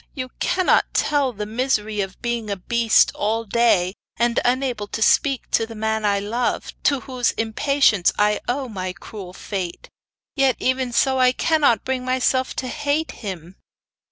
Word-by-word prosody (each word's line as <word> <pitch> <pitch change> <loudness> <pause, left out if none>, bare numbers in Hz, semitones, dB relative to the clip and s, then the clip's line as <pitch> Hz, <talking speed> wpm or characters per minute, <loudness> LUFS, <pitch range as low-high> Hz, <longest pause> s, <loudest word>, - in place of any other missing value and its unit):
You 255 -2 -4
cannot 370 -1 +2
tell 285 -3 +2
the 210 -2 -5
misery 220 -2 -1
of 195 -1 -6
being 235 -2 -2
a 200 - -1
beast 230 +4 +3
all 220 +2 -1
the 210 - -19
day, 195 -6 +3 0.2
and 235 +1 +2
unable 245 -4 0
to 220 - -5
speak 270 +4 +2
to 225 - +2
the 225 - -9
man 220 0 -1
I 200 -1 +2
love, 230 +5 -2
to 280 -3 +2
whose 255 -3 -1
impatience 225 -3 +2
I 210 0 +2
owe 260 +2 -1
my 185 -5 -5
cruel 185 +1 -10
fate. 185 -2 -6 0.5
Yet, 270 -3 +3
even 255 -1 0
so, 265 +2 +2
I 255 0 +5
cannot 285 -8 +2
bring 260 -1 -2
myself 255 0 0
to 255 - -3
hate 295 +3 -1
him. 185 -4 -8
235 Hz, 165 wpm, -22 LUFS, 210-260 Hz, 0.5 s, I